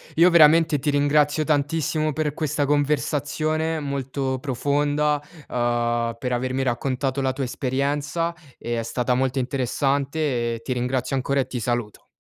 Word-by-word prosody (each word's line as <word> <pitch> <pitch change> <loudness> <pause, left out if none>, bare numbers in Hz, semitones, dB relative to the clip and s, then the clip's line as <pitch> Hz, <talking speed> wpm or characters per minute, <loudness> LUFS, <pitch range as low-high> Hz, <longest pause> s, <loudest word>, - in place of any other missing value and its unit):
Io 170 +3 +6
veramente 160 -2 +6
ti 145 +2 -1
ringrazio 145 +1 +2
tantissimo 155 +1 0
per 150 0 -1
questa 150 -1 -1
conversazione, 150 +2 0
molto 135 -2 -3
profonda, 145 +3 0 0.3
uhm, 120 -1 0
per 125 0 -3
avermi 130 +2 -1
raccontato 130 +2 -1
la 130 - +1
tua 135 0 -2
esperienza, 145 +6 -1 0.2
e 120 0 -3
è - - -2
stata 125 +2 -1
molto 130 +1 0
interessante 135 0 0
e 115 - -9
ti 130 - -2
ringrazio 125 +1 -1
ancora 140 +1 0
e 135 - 0
ti 125 - -4
saluto. 120 -2 -3
140 Hz, 145 wpm, -23 LUFS, 125-150 Hz, 0.3 s, Io